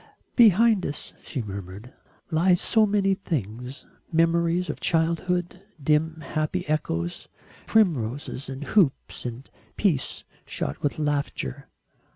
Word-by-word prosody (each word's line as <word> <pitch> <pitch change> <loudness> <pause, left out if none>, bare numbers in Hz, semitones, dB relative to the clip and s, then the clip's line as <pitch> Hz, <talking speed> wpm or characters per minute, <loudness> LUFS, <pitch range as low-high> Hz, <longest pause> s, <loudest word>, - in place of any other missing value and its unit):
"Behind 220 -2 +6
us," 145 - -4
she 130 - -4
murmured, 100 +3 -8 0.4
"lie 175 +3 +4
so 215 +4 +3
many 200 -1 +2
things 125 - -4 0.3
memories 170 +2 +2
of 150 - -4
childhood, 175 +2 0 0.2
dim 155 +2 +1
happy 165 +2 -2
echoes, 85 - -2 0.4
primroses 140 - +1
and 135 +2 -5
hoops 150 -8 +1
and 120 +3 -7 0.3
peace 165 -11 0 0.2
shot 70 - -4
with 145 - -1
laughter. 145 - -2
155 Hz, 110 wpm, -25 LUFS, 130-180 Hz, 0.4 s, Behind